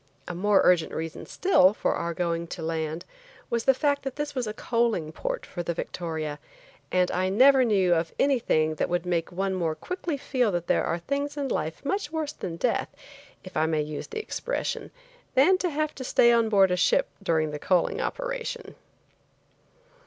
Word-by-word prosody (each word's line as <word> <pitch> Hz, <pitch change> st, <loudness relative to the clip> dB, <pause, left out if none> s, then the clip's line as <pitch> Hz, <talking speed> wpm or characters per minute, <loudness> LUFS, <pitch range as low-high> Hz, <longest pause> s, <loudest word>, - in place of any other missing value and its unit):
A -, -, -4 dB
more 200 Hz, +3 st, +3 dB
urgent 175 Hz, -3 st, +3 dB
reason 160 Hz, 0 st, -5 dB
still, 210 Hz, -, +4 dB
for -, -, 0 dB
our 170 Hz, 0 st, -3 dB
going 170 Hz, -1 st, -1 dB
to 170 Hz, -1 st, -7 dB
land, 160 Hz, +1 st, -3 dB, 0.5 s
was 235 Hz, -1 st, 0 dB
the 270 Hz, -, +6 dB
fact 285 Hz, +1 st, +1 dB
that 270 Hz, -1 st, -5 dB
this 295 Hz, 0 st, -3 dB
was 255 Hz, -4 st, -2 dB
a -, -, -2 dB
coaling 230 Hz, -11 st, 0 dB
port -, -, -4 dB
for 175 Hz, -, -5 dB
the 170 Hz, 0 st, -3 dB
Victoria, 160 Hz, -4 st, -4 dB, 0.5 s
and 180 Hz, -1 st, +2 dB
I 185 Hz, +1 st, 0 dB
never 260 Hz, +6 st, +6 dB
knew 195 Hz, -6 st, +3 dB
of 165 Hz, -1 st, 0 dB
anything 220 Hz, -, +2 dB
that 155 Hz, -, -2 dB
would 175 Hz, 0 st, -1 dB
make 175 Hz, -1 st, -1 dB
one 190 Hz, +2 st, -1 dB
more 170 Hz, -4 st, -1 dB
quickly 345 Hz, -, -4 dB
feel 250 Hz, -5 st, 0 dB
that 175 Hz, -1 st, -1 dB
there -, -, +2 dB
are 170 Hz, -, 0 dB
things 280 Hz, -, -3 dB
in 280 Hz, -2 st, -2 dB
life 160 Hz, -, -3 dB
much 385 Hz, -1 st, -1 dB
worse 310 Hz, -2 st, -2 dB
than 175 Hz, -, -5 dB
death, -, -, 0 dB, 0.5 s
if -, -, -11 dB
I 160 Hz, -, +2 dB
may 155 Hz, -2 st, +1 dB
use 150 Hz, 0 st, -6 dB
the 445 Hz, -, -7 dB
expression, 475 Hz, +3 st, -3 dB, 0.5 s
than 365 Hz, +8 st, +5 dB
to 360 Hz, -, 0 dB
have 305 Hz, 0 st, -1 dB
to 260 Hz, -, -7 dB
stay 240 Hz, -1 st, +4 dB
on 230 Hz, -1 st, +3 dB
board 195 Hz, -3 st, +5 dB
a 180 Hz, -, +1 dB
ship -, -, +3 dB
during 160 Hz, -5 st, +1 dB
the 150 Hz, -, -5 dB
coaling 180 Hz, +3 st, +1 dB
operation. -, -, -4 dB
195 Hz, 190 wpm, -26 LUFS, 170-280 Hz, 0.5 s, the